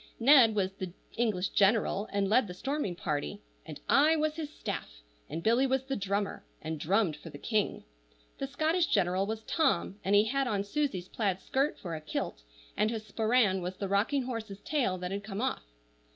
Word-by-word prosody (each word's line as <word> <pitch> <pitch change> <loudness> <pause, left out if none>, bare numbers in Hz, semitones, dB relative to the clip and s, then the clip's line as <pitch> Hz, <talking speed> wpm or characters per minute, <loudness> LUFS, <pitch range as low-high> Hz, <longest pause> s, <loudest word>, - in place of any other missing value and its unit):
Ned 240 -3 +7
was 190 -2 +1
the 185 -2 -6 0.2
English 210 -5 0
general, 205 0 +2
and 200 -1 +1
led 225 +3 +3
the 180 - -7
storming 270 -3 -2
party, 150 +5 -3 0.3
and 155 -2 -7
I 305 +3 +5
was 310 0 0
his 310 -2 -4
staff, - - -5 0.4
and 165 - -4
Billy 240 +4 +4
was 265 0 +1
the 270 0 -3
drummer, 200 -1 -2 0.2
and 160 0 -4
drummed 185 +1 +2
for - - -10
the - - -9
king. 215 +6 -1 0.6
The 275 - -2
Scottish 320 +5 +1
general 190 -1 +2
was 220 0 -4
Tom, 270 - +1
and 200 +2 +2
he 205 - +7
had 270 +4 0
on 205 -4 0
Susie's 200 -5 -2
plaid 195 -4 -1
skirt 270 +8 0
for 170 -3 -6
a 155 - -6
kilt, 150 - -4 0.3
and 215 - +2
his 220 -1 -4
sporran 215 -2 +2
was 180 +1 -4
the 200 - -3
rocking 215 +8 +1
horse's 225 -5 -5
tail 255 -11 0
that 180 0 -4
had 200 +1 -3
come 195 0 -5
off. 230 - -2
210 Hz, 195 wpm, -30 LUFS, 190-260 Hz, 0.6 s, Ned